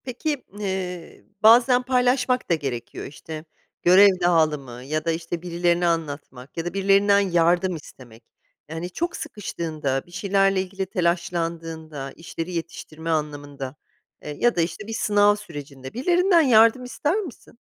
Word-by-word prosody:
Peki, 275 +3 -3
ııı, 190 -4 -5 0.2
bazen 245 +3 +6
paylaşmak 250 0 +1
da 170 - +4
gerekiyor. 130 -6 -5
İşte, 155 +2 -9 0.4
görev 190 +3 +8
dağılımı 150 -8 +1
ya 155 +3 -3
da 165 - +2
işte 165 +1 -4
birilerine 175 0 +1
anlatmak 145 -5 -4
ya 165 - -3
da 175 - -4
birilerinden 200 +1 +4
yardım 175 -1 +2
istemek. 120 -6 -13 0.5
Yani, 165 +3 -5
çok 345 - -3
sıkıştığında, 155 - -4
bir 175 - -20
şeylerle 195 +1 +2
ilgili 190 +1 -4
telaşlandığında, 165 -5 -3
işleri 165 +1 -7
yetiştirme 165 -1 -6
anlamında, 145 -3 -3 0.5
ııı, 150 - -4
ya 240 +9 +2
da 170 - +2
işte 175 +5 -4
bir 225 - -5
sınav 205 -1 +3
sürecinde 140 -8 -9
birilerinden 350 - +3
yardım 230 -2 +5
ister 290 +6 -1
misin? 345 - -7
175 Hz, 135 wpm, -23 LUFS, 155-205 Hz, 0.5 s, görev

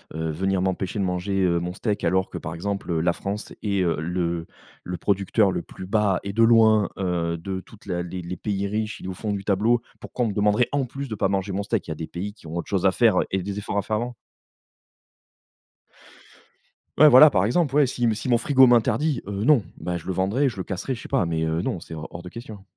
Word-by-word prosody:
heu, 80 0 -2
venir 95 +4 0
m'empêcher 95 +1 -2
de - - +1
manger, 95 +2 -1
heu, 85 -2 +2
mon 90 +1 -4
steak. 105 +2 -2
Alors 95 +2 +1
que, - - -6
par 80 -1 -6
exemple, 100 +2 -4
heu, 80 - +1
la 85 +1 +2
France 100 +2 -5
est, 100 -3 0
heu, 85 -2 +1
le 85 0 -2 0.4
le 90 0 -4
producteur 100 +1 +2
le - - -2
plus 95 - -10
bas, 100 -2 +2
et 100 - -4
de 115 +2 +3
loin, 110 -2 +5
heu, 85 -3 -1
de 95 +3 -5
toute 110 +4 -18
la 90 -3 -2
les 90 +1 -6
les 90 +1 -6
pays 100 -2 -2
riches. 105 +2 -3
Il - - -10
est - - -4
au 95 - -4
fond 105 +3 -4
du 100 -1 -4
tableau. 110 +4 +2 0.2
Pourquoi 125 - -2
on - - 0
me 105 - -2
demanderait, 105 +3 +2
en 145 -1 +1
plus, 140 +3 -6
de 110 - -4
pas 95 - 0
manger 100 0 -1
mon 100 +2 -1
steak? 105 - -2
Il 80 - -4
y - - -1
a - - -9
des 80 +1 -6
pays 100 +4 -5
qui 100 -6 -15
ont 80 - -6
autre 85 - -4
chose - - 0
à - - +6
faire, - - +3 0.2
et 95 -1 0
des 100 +1 -4
efforts 100 0 -4
à - - +3
faire 110 +2 -2
avant. 120 +2 -4 2.8
Ouais, 155 - +9
voilà, 145 +3 +9
par 95 - +2
exemple. 140 +5 +1
Ouais, 145 -2 +5
si 120 -1 -1
si 115 - -5
mon 120 - +5
frigo 130 +1 +5
m'interdit, 125 +4 +2
heu, 100 0 -3
non, 140 -5 +5
bah, 90 -1 -3
je 80 - -11
le 95 - -2
vendrai, 100 +10 +1
je 120 - -4
le 95 - -3
casserai, 100 +8 -4
je 115 - -7
sais - - -9
pas, - - +1
mais 80 -1 -1
heu, 80 +1 0
non 90 - -2
c'est 80 - -9
hors 75 - -6
hors 85 - -8
de 90 - -9
question. 110 -2 -10
100 Hz, 260 wpm, -24 LUFS, 90-110 Hz, 2.8 s, Ouais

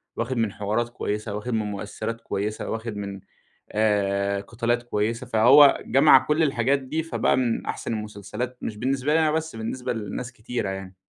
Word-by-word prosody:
واخِد 120 +2 -2
من 110 -3 +1
حوارات 110 +3 -1
كويسة، 105 -2 -3
واخِد 115 +4 -4
من 110 -1 0
مؤثِّرات 110 +3 -5
كويسة، 105 -1 -3
واخِد 110 -1 -4
من 100 -1 -5 0.5
آآ، 100 -2 +1
قِتالات 120 +3 -1
كويسة، 115 +1 -2
فهو 125 +5 +7
جَمَع 140 +3 +7
كل 150 +2 +2
الحاجات 135 -1 +2
دي 145 +5 -3
فبقى 165 - +1
من 120 -3 0
أحسن - - -3
المسلسلات، 105 +3 -5
مش 110 - -4
بالنسبة 135 +4 0
لي 160 - +4
أنا 155 -1 +3
بس، 160 -2 -2
بالنسبة 115 +3 -3
لناس 115 +3 -5
كتيرة 115 -3 -4
يعني. 95 -1 -6
115 Hz, 170 wpm, -25 LUFS, 105-125 Hz, 0.5 s, فهو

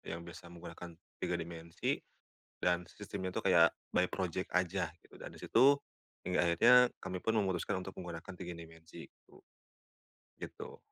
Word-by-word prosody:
yang 85 - -8
bisa 85 0 -10
menggunakan 85 0 -9 0.2
3 90 -1 -1
dimensi, 85 0 -3 0.6
dan 90 -1 +2
sistemnya 95 -2 -5
itu - - -3
kayak 85 -3 +6 0.2
by 90 - +4
project 95 -1 -2
aja 90 -1 +1
gitu. - - -19
Dan - - -8
di - - -12
situ, 140 +4 +5 0.5
hingga 90 -1 +2
akhirnya 85 +9 +6 0.2
kami 95 -1 -5
pun 110 0 +2
memutuskan 95 -1 0
untuk 95 - -8
menggunakan 85 +1 -7
3 90 -1 -7
dimensi 80 0 -11
itu. - - -22 1.0
Gitu. - - -8
90 Hz, 150 wpm, -34 LUFS, 85-95 Hz, 1.0 s, kayak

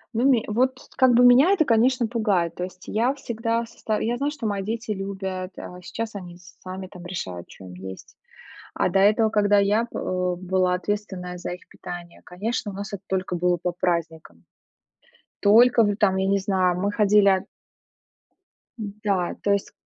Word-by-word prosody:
Ну 235 +3 +2
ме 245 -5 +4
вот 255 +5 +1 0.2
как 260 -2 +5
бы 245 +1 +6
меня 255 +9 +7
это, 365 -6 +3
конечно, 245 +1 +3
пугает, 205 -8 0
то 180 - -5
есть 185 0 -8
я 240 +6 +1
всегда 230 -3 -2
соста 220 -1 -3
я 235 +2 -1
знаю, 280 +3 0
что 290 -6 -7
мои 205 -2 -1
дети 225 +2 -4
любят, 190 -2 -5
а 180 0 -9
сейчас 225 +5 -5
они 180 -4 -8 0.3
сами 185 +1 -6
там 180 -2 -12
решают, 90 - -6
чё 95 - -13
им 90 - -10
есть. 95 +1 -10 0.6
А - - +1
до 195 +2 +2
этого, 215 +3 +4
когда 205 -1 +3
я 205 +3 +3
б - - -22
э, 180 -1 -1
была 185 0 +1
ответственная 185 -2 -4
за 175 - -5
их 180 - -12
питание, 175 -1 -9
конечно, 210 +4 -3
у - - -10
нас 200 +1 -6
это 200 - -5
только 185 -1 -2
было 175 0 +1
по 180 +1 -2
праздникам. 165 - -3 1.0
Только 230 +3 +6
в 205 -1 +1
там, 195 -3 +2
я 190 0 0
не 200 +1 +3
знаю, 185 -2 +1
мы 200 +2 0
ходили 205 -2 +4 1.3
Да, 200 -4 -2
то 200 - +2
есть 200 -1 0
200 Hz, 180 wpm, -24 LUFS, 180-225 Hz, 1.3 s, меня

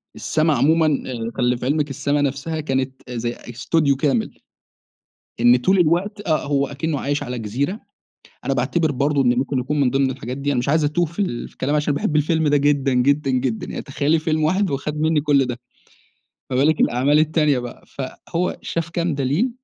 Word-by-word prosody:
السما 155 0 +1
عمومًا 160 +3 +3 0.2
آآ، 115 -3 -4
خلّي 125 0 +2
في 120 - -6
علمِك 145 +2 0
السما 140 +2 0
نفسها 145 +3 -2
كانت 130 -2 -2
زي 120 -1 -2
استوديو 140 +5 0
كامل. 135 -5 -1 1.0
إن 120 +1 +6
طول 185 +10 +2
الوقت 190 +5 +1
آه، 155 -2 +1
هو 140 -1 +1
أكنه 145 +1 -3
عايش 145 +2 -1
على 125 0 -5
جزيرة 135 - -2 0.7
أنا - - 0
باعتبر 165 -3 +1
برضو 140 +2 +1
إن 120 -1 +2
ممكن 135 +1 -1
يكون 145 +4 -1
من 130 -3 +3
ضمن 135 0 +1
الحاجات 125 -1 -6
دي 145 +1 -1
أنا 130 - 0
مش 120 - -1
عايز 155 +2 +3
أتوه 150 +4 +1
فال 170 -6 -3
فالكلام 140 +3 -2
عشان 150 -1 0
باحب 150 +2 0
الفيلم 160 +1 +2
ده 145 - +4
جدًا، 140 -1 +2
جدًا، 140 +3 +2
جدًا، 125 -3 -1
يعني - - -5
تخيّلي 145 +3 0
فيلم 155 -1 0
واحد 185 +4 +1
وخد 150 +2 -3
مِنّي 160 -1 +2
كل 145 -2 +3
ده، 120 -1 -5 0.9
فبالك 140 +4 +2
الأعمال 135 +5 +3
التانية 155 -3 +2
بقى؟ 120 -1 -9
فهو 165 +6 -4
شاف 165 -1 -3
كام 170 -1 -1
دليل 145 - 0
145 Hz, 185 wpm, -21 LUFS, 130-155 Hz, 1.0 s, إن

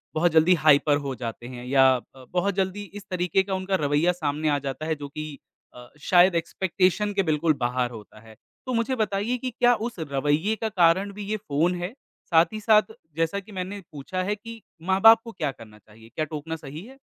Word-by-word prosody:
बहुत 170 +2 +3
जल्दी 160 +3 +5
हाइपर 145 0 +5
हो 135 -1 -3
जाते 120 -1 -6
हैं 125 -1 -8
या 135 +1 +5 0.3
अ, 130 -1 -14
बहुत 200 +3 +1
जल्दी 190 +2 -3 0.2
इस - - -19
तरीके 180 0 +1
का 195 0 -4
उनका 190 +1 -1
रवैया 145 +5 +2
सामने 150 +1 0
आ 145 -1 +1
जाता 135 +3 -4
है 160 0 0
जो - - -4
कि 155 +2 -6 0.5
अ, 125 0 -12 0.2
शायद 180 0 +6
एक्सपेक्टेशन 185 +4 0
के 195 -1 +1
बिल्कुल 155 +1 +2
बाहर 125 0 -1
होता 105 +1 -16
है, 110 0 -16 0.3
तो 255 - -3
मुझे 235 +3 0
बताइए 210 +4 -1
कि 255 +1 -4
क्या 245 0 +5 0.2
उस 225 - -15
रवैये 150 +7 0
का - - 0
कारण 190 0 +3
भी - - -4
ये 215 - 0
फ़ोन 170 -2 0
है? 180 +6 -4 0.4
साथ 165 -1 +6
ही 215 - -4
साथ 215 0 +4 0.3
जैसा 165 +4 0
कि 200 +2 -14
मैंने 190 +1 -5
पूछा 155 +6 -4
है 200 +3 -1
कि 230 +2 -11 0.4
माँ-बाप 225 +4 +7
को 230 - -8
क्या 145 - -2
करना 110 -4 -15
चाहिए? 110 +2 -18
क्या 155 - -1
टोकना 155 +1 -5
सही 150 0 -9
है? 265 +3 -14
170 Hz, 210 wpm, -25 LUFS, 145-200 Hz, 0.5 s, माँ-बाप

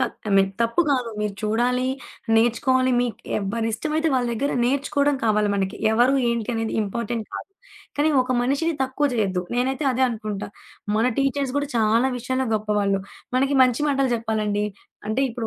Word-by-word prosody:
కాదు. - - -1
I - - -1
mean 195 0 +4
తప్పు 230 +8 +1
కాదు. 255 -4 +1
మీరు 210 -1 -2
చూడాలి, 245 +4 +1 0.5
నేర్చుకోవాలి, 255 +3 +3
మీకు 245 -2 -2 0.2
ఎవ్వరిష్టమైతే 230 +10 -1
వాళ్ళ 250 -1 +1
దగ్గర 280 +5 -1
నేర్చుకోవడం 280 +2 +1
కావాలి 210 -1 +2
మనకి. 195 +1 -1 0.2
ఎవరు, 245 +4 +4 0.2
ఏంటి 235 -2 -2
అనేది 225 -1 -2
ఇంపార్టెంట్ 230 +2 -3
కాదు. - - -7 0.5
కానీ 295 +2 +3
ఒక 255 - -7
మనిషిని 285 +6 0
తక్కువ 265 +3 0
చేయొద్దు. 195 -5 0
నేనైతే 260 +4 0
అదే 255 +1 0
అనుకుంటా. 215 -3 -4 0.5
మన 220 - +2
టీచర్స్ 275 -1 0
కూడా 285 0 0
చాలా 225 +3 +3
విషయాల్లో 260 +2 -1
గొప్పవాళ్ళు. 210 -2 +1 0.4
మనకి 270 +2 +2
మంచి 250 +1 +2
మాటలు 275 -2 +1
చెప్పాలండి. 215 -2 -1 0.4
అంటే 220 +5 0
ఇప్పుడు 230 0 -4
240 Hz, 155 wpm, -23 LUFS, 215-265 Hz, 0.5 s, mean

